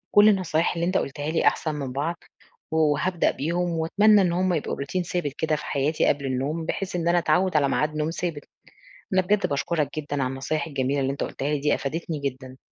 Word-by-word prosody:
كل 205 Hz, +1 st, +8 dB
النصايح 180 Hz, -5 st, +1 dB
اللي 170 Hz, -1 st, -1 dB
أنتَ 185 Hz, +2 st, +1 dB
قلتها 145 Hz, +2 st, -3 dB
لي 165 Hz, -, +2 dB
أحسن 155 Hz, -2 st, +1 dB
من 140 Hz, -3 st, -4 dB
بعض، 150 Hz, +6 st, -2 dB, 0.6 s
وهابدأ 160 Hz, +3 st, +2 dB
بيهم 175 Hz, +4 st, -1 dB
وأتمنى 205 Hz, +6 st, +5 dB
إن 180 Hz, -2 st, +2 dB
هم 185 Hz, +1 st, +1 dB
يبقوا 155 Hz, -, -2 dB
Routine 180 Hz, +7 st, -2 dB
ثابت 175 Hz, -5 st, -2 dB
كده 155 Hz, -1 st, +1 dB
في 150 Hz, -, -6 dB
حياتي 145 Hz, +2 st, 0 dB
قبل 140 Hz, -1 st, +1 dB
النوم، 135 Hz, +5 st, -2 dB
بحيث 190 Hz, +2 st, -3 dB
إن 170 Hz, -1 st, -1 dB
أنا 175 Hz, +1 st, +4 dB
أتعوِّد 175 Hz, +2 st, +1 dB
على 140 Hz, -2 st, +3 dB
ميعاد 150 Hz, +2 st, 0 dB
نوم 155 Hz, +1 st, 0 dB
ثابت. 165 Hz, -3 st, -4 dB, 0.7 s
أنا 185 Hz, -, +5 dB
بجد 200 Hz, +2 st, +1 dB
باشكُرَك 145 Hz, +1 st, -1 dB
جدًا 145 Hz, -2 st, -2 dB
على -, -, 0 dB
النصايح 140 Hz, +5 st, -2 dB
الجميلة 140 Hz, -1 st, -1 dB
اللي 135 Hz, 0 st, 0 dB
أنتَ 140 Hz, -, -3 dB
قُلتها 135 Hz, -, -4 dB
لي 150 Hz, -1 st, 0 dB
دي، 145 Hz, +1 st, +2 dB
أفادِتني 160 Hz, +2 st, -4 dB
جدًا. 130 Hz, -2 st, -5 dB
155 Hz, 210 wpm, -25 LUFS, 140-175 Hz, 0.7 s, كل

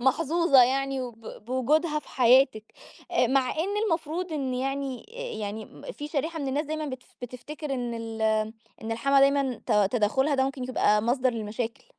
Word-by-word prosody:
محظوظة 290 Hz, +1 st, +4 dB
يعني 270 Hz, +1 st, +1 dB
وب 230 Hz, -2 st, -9 dB
وجودها 300 Hz, +5 st, +1 dB
في -, -, -13 dB
حياتِك 250 Hz, -3 st, +4 dB, 0.5 s
آآ، 250 Hz, -, +3 dB
مع 260 Hz, 0 st, +2 dB
إن 390 Hz, +6 st, -2 dB
المفروض 330 Hz, +1 st, -2 dB
إن 265 Hz, -4 st, -2 dB
يعني 270 Hz, -, -3 dB
آآ، -, -, -5 dB
يعني 210 Hz, +1 st, -4 dB
م -, -, -15 dB
في 295 Hz, 0 st, -7 dB
شريحة 320 Hz, +2 st, -2 dB
من 275 Hz, -2 st, -2 dB
الناس 285 Hz, +3 st, 0 dB
دايمًا 310 Hz, 0 st, -3 dB
بتف 255 Hz, -3 st, -8 dB
بتفتكر 275 Hz, +4 st, -6 dB
إن 245 Hz, -2 st, -3 dB
ال 225 Hz, -1 st, -5 dB, 0.6 s
إن 225 Hz, +1 st, -3 dB
الحماة 275 Hz, +4 st, +3 dB
دايمًا 275 Hz, -3 st, +2 dB
ت -, -, +1 dB, 0.2 s
تدخُّلها 265 Hz, +6 st, +2 dB
ده 265 Hz, -, +2 dB
ممكن 265 Hz, -1 st, -3 dB
يبقى 210 Hz, -4 st, +2 dB
مصدر 255 Hz, +2 st, +2 dB
للمشاكل. 225 Hz, -, -4 dB
265 Hz, 170 wpm, -27 LUFS, 240-295 Hz, 0.6 s, محظوظة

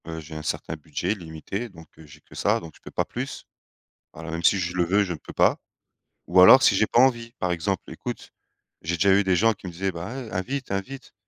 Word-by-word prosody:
Heu, 80 Hz, -1 st, -6 dB
j'ai 80 Hz, 0 st, -11 dB
un 80 Hz, -, -5 dB
certain 75 Hz, +1 st, -3 dB
budget, 75 Hz, +5 st, -3 dB
limité, 95 Hz, +5 st, -6 dB
donc 80 Hz, -4 st, -14 dB
heu, 80 Hz, -, -13 dB
j'ai 75 Hz, -, -16 dB
que -, -, -20 dB
ça, -, -, +1 dB
donc 80 Hz, -1 st, -11 dB
je -, -, -21 dB
peux -, -, -10 dB
pas -, -, -1 dB
plus. -, -, -6 dB, 0.7 s
Alors 80 Hz, +1 st, -8 dB
même 85 Hz, +1 st, -4 dB
si 100 Hz, -, +4 dB
je 90 Hz, 0 st, -3 dB
le 90 Hz, -, +2 dB
veux, 100 Hz, +4 st, +3 dB
je 90 Hz, -3 st, -3 dB
ne -, -, -7 dB
peux -, -, -12 dB
pas. -, -, +3 dB, 0.7 s
Ou 90 Hz, +1 st, +5 dB
alors 130 Hz, +8 st, +9 dB
si 100 Hz, -, +5 dB
j'ai 110 Hz, +2 st, +2 dB
pas 120 Hz, -, +3 dB
envie, 120 Hz, -3 st, +3 dB
par 90 Hz, -, 0 dB
exemple, 90 Hz, +2 st, -1 dB
écoute, -, -, -7 dB, 0.5 s
j'ai 85 Hz, +2 st, -2 dB
déjà 100 Hz, +2 st, +4 dB
eu 100 Hz, +1 st, +4 dB
des 95 Hz, -1 st, +2 dB
gens 115 Hz, +5 st, +3 dB
qui 95 Hz, -, -11 dB
me -, -, -5 dB
disaient: 95 Hz, +3 st, -2 dB
«Bah, 85 Hz, +1 st, -6 dB, 0.2 s
ouais, 110 Hz, -, -10 dB
invite, 130 Hz, +8 st, -3 dB
invite», 130 Hz, +8 st, -5 dB
90 Hz, 250 wpm, -25 LUFS, 80-100 Hz, 0.7 s, alors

